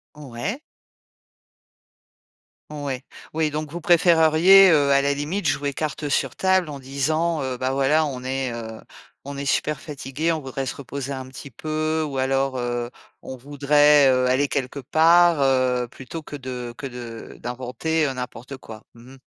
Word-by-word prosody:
Ouais. 150 - -5 2.1
Ouais, 140 -4 -4 0.3
oui, 160 -1 +1
donc 150 0 -5
vous 175 +1 -6
préféreriez, 175 +2 +6
heu, 145 -4 +4
à 140 0 +5
la 140 0 +1
limite, 155 +8 -2
jouer 140 0 -1
carte 150 0 -3
sur 140 - -1
table 190 -3 +2
en 145 - -6
disant: 155 +5 -1
«Heu, 130 -2 -3
bah 130 +1 -1
voilà, 140 +4 +2
on 130 -4 -5
est, 130 0 -2
heu, 110 -1 -7 0.5
on 140 0 -7
est 140 - -4
super 150 -1 0
fatigué, 150 +1 -3
on 160 - -1
voudrait 135 -1 -5
se - - -4
reposer 140 0 -6
un 130 -1 -5
petit 130 +2 -10
peu», 155 +4 -2
ou 135 -2 -4
alors: 135 0 0
«Heu, 120 0 -3 0.3
on 130 - -7
voudrait, 145 +2 +4
heu, 130 0 +2
aller 130 +3 +2
quelque 135 0 -3
part», 165 +4 +4
heu, 130 -2 +2
plutôt 135 +6 -8
que 150 - -9
de 125 -3 -6
que - - -7
de 120 -3 -8
d'inventer, 130 +6 -2
heu, 135 - -1
n'importe 125 +1 -7
quoi. 110 -4 -12
Mmh 120 +3 -15
mh. - - -19
140 Hz, 170 wpm, -23 LUFS, 130-155 Hz, 2.1 s, préféreriez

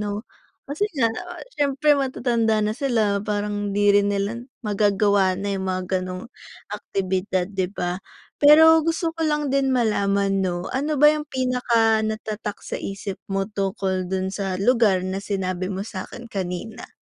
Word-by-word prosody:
'no? 205 +1 -3 0.4
Kasi 305 +10 -2
nga, 230 -4 +2
ah, - - -8
syempre 290 - +2
matatanda 235 -6 +1
na 210 - 0
sila, 220 -5 0
parang 205 0 -2
hindi 205 0 +3
rin 205 0 +4
nila 205 +3 -1 0.2
magagawa 200 -2 +2
na 200 +1 -3
yung 190 -1 -2
mga 185 0 -1 0.2
gano'ng 185 +2 -6 0.5
aktibidad, 190 -1 -1
'di 190 -2 -1
ba? 180 -1 -3 0.4
Pero 320 +2 +8
gusto 330 +1 -1
ko 330 - -9
lang 295 -2 0
din 275 -1 +2
malaman, 200 -5 +1
'no, 180 -1 -2
ano 295 +3 0
ba 300 +2 +7
yung 300 -1 -4
pinakanatatak 225 -5 0
sa - - -5
isip 195 0 -5
mo 195 0 0
tungkol 195 -2 -2
dun 190 0 -2
sa 195 -2 -2
lugar 205 -3 +3
na 190 +1 -3
sinabi 185 -2 -2
mo 195 0 -3
sa 185 -4 -5
akin 240 - -10
kanina? 190 0 -5
205 Hz, 155 wpm, -23 LUFS, 195-245 Hz, 0.5 s, Pero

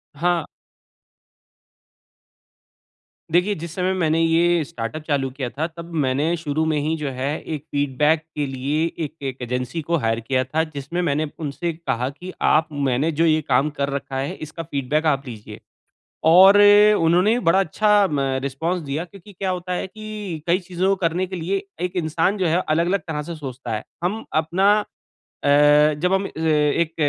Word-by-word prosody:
हाँ। 170 +1 0 2.9
देखिए, 180 +5 +3
जिस 165 +1 -7
समय 185 0 0
मैंने 165 -3 +1
ये 165 +1 +3
स्टार्टअप 125 +5 -5
चालू 140 -3 0
किया 130 -2 -4
था 150 +5 -3
तब 170 0 -11
मैंने 145 +6 +1
शुरू 155 -1 -1
में 155 -1 +1
ही 155 +2 0
जो 150 -2 -3
है 130 - -2 0.3
एक 145 - -8
फीडबैक 145 +2 +1
के 150 - -1
लिए 140 +4 -1 0.2
एक 145 - -9 0.2
एक 130 0 -10
एजेंसी 125 +6 -3
को 170 +3 0
हायर 115 0 +1
किया 130 +3 0
था 155 +5 -1
जिसमें 145 +6 -3
मैंने 155 -2 0
उनसे 160 +2 -3
कहा 130 -6 -2
कि 180 +6 -9 0.2
आप 160 +2 +3 0.2
मैंने 135 +6 +1
जो 165 - +5
ये 155 -1 +3
काम 135 +4 +3
कर 140 - 0
रखा 135 -1 -4
है 135 +2 -2
इसका 160 +2 -7
फीडबैक 150 +1 -1
आप 140 -2 +1
लीजिए। 110 -4 -9 0.7
और 190 +4 +8 0.4
उन्होंने 180 +8 +3
बड़ा 190 - +4
अच्छा 205 +3 +3
म 145 - 0 0.2
रिस्पॉन्स 165 +6 -2
दिया 145 +3 -3
क्योंकि 200 +2 -15
क्या 190 +1 -3
होता 180 0 -3
है 180 - -3
कि 210 -6 -7
कई 175 +2 +3
चीज़ों 185 0 -2
को 195 - +3
करने 175 +3 0
के 185 - -6
लिए 185 +3 -2 0.2
एक 180 +1 -3
इंसान 165 +6 +1
जो 185 - 0
है 170 +3 +2
अलग-अलग 170 +5 +2
तरह 150 -2 -3
से - - -5
सोचता 130 -4 -7
है। 105 - -5 0.2
हम 210 +5 -1 0.2
अपना 190 +5 +3 0.7
अ, 145 - +2 0.5
जब 180 +1 +2
हम 195 +1 +1
ए - - -8 0.5
एक 165 -1 -5
160 Hz, 175 wpm, -22 LUFS, 140-180 Hz, 2.9 s, और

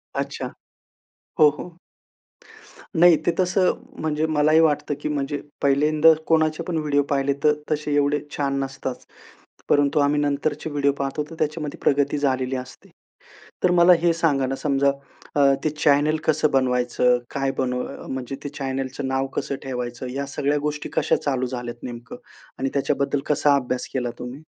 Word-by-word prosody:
अच्छा. - - -3 0.9
हो 150 - +8
हो. 175 -1 -9 1.2
नाही, 175 -1 +8
ते 175 - +4
तसं 185 +1 +2 0.3
म्हणजे 155 0 0
मला 155 -1 +2
ही 160 - +6
वाटतं 150 -2 +2
की 150 - -2
म्हणजे 145 0 -2 0.2
पहिल्यांदा 150 +3 +4
कोणाचे 155 -1 +2
पण 170 - -1
व्हिडिओ 145 -2 +1
पाहिले 140 0 +1
तर 150 0 +5 0.2
तसे 150 -1 -1
एवढे 145 0 +2 0.2
छान 140 -1 0
नसतातच. 135 -1 -6 0.6
परंतु 145 +1 +3
आम्ही 145 +1 +2
नंतरचे 145 +2 -1
व्हिडिओ 145 -1 +1
पाहतो 140 +1 -3
तर 165 - -9
त्याच्यामध्ये 150 -1 -2
प्रगती 145 +1 +2
झालेली 130 -2 0
असते. 130 -1 -9 0.8
तर 180 - +5
मला 175 0 +6
हे 170 -1 +4
सांगा 145 -5 +1
ना 135 - -2
समजा 140 -1 +1 0.4
अ, 145 - +3 0.2
ते 155 - +2
चॅनेल 150 0 +2
कसं 155 -1 +2
बनवायचं? 125 -2 +2
काय 135 -1 -1
बनव 125 -1 -3
म्हणजे 130 0 -4
ते 145 - -2
चॅनेलचं 135 0 -3
नाव 135 0 0
कसं 140 - -2
ठेवायचं? 125 -1 -4
या 140 +2 -3
सगळ्या 145 +1 -1
गोष्टी 150 0 -3
कशा - - +3
चालू 130 -3 -1
झाल्या 120 -1 -6
नेमकं 120 -1 -8 0.4
आणि 135 +1 0
त्याच्याबद्दल 140 0 0
कसा 145 -1 +3
अभ्यास 125 -1 -2
केला 125 -2 -1
तुम्ही? 125 +2 -7
145 Hz, 155 wpm, -23 LUFS, 135-150 Hz, 1.2 s, हो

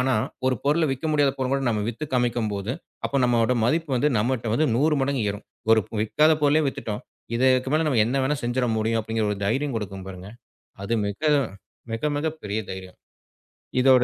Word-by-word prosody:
ஆனா, 130 +1 +2 0.3
ஒரு 130 - +3
பொருள 155 +3 +3
விக்க 135 +5 -4
முடியாத 145 -2 +3
பொருளைக் 130 0 -1
கூட 135 - -1
நம்ம 105 -2 0
வித்து 120 +6 -4
காமிக்கும்போது, 115 -3 0 0.3
அப்ப 140 - 0
நம்மளோட 120 0 +3
மதிப்பு 155 +5 +1
வந்து 150 +5 +3
நம்மகிட்ட 120 0 0
வந்து 155 +5 +2
100 150 +5 +3
மடங்கு 135 -3 0
ஏறும். 105 +1 -7 0.3
ஒரு 110 -1 +7 0.2
விக்காத 155 +8 +4
பொருளே 145 +2 +4
வித்துட்டோம். 110 -6 -4 0.3
இதுக்கு 130 +1 +3
மேல 160 +1 +3
நம்ம 130 -7 +3
என்ன 125 - -1
வேணா 140 +3 +1
செஞ்சிட 120 +1 0
முடியும் 110 +1 +1
அப்படிங்கிற 110 0 -2
ஒரு 105 - -2
தைரியம் 135 +5 0
கொடுக்கும் 95 -3 -5
பாருங்க. 90 0 -9 0.6
அது 115 - -1
மிக 100 - -5 0.7
மிக 115 +7 -1
மிக 145 +2 0 0.2
பெரிய 105 +1 -2
தைரியம். 95 -1 -9 0.8
இதோட 130 -1 +6
125 Hz, 180 wpm, -24 LUFS, 110-140 Hz, 0.8 s, ஒரு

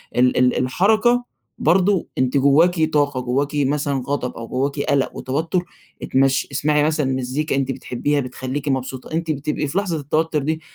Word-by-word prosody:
ال 125 +1 +3
ال 125 0 +3
الحركة 215 - +2 0.3
برضو 185 +3 +2
أنتِ 130 +1 +1
جواكِ 160 +5 +4
طاقة، 145 -3 +2
جواكِ 130 +3 0
مثلًا 140 -1 0
غضب 140 -3 -2
أو 115 0 -7
جواكِ 140 +3 -2
قلَق 140 -1 0
وتوتر، 160 +7 -1 0.4
إتمشي، 135 0 +2
إسمعي 150 +2 +1
مثلًا 155 -2 +1
مزيكا 130 +4 -2
أنتِ 135 -1 0
بتحبيها 145 +3 -2
بتخليكِ 130 +2 -4
مبسوطة، 130 0 -3
أنتِ 165 0 -1
بتبقي 150 +1 -2
في 140 - -3
لحظة 190 -5 0
التوتر 155 +2 0
دي 160 +2 -2
145 Hz, 155 wpm, -21 LUFS, 130-160 Hz, 0.4 s, جواكِ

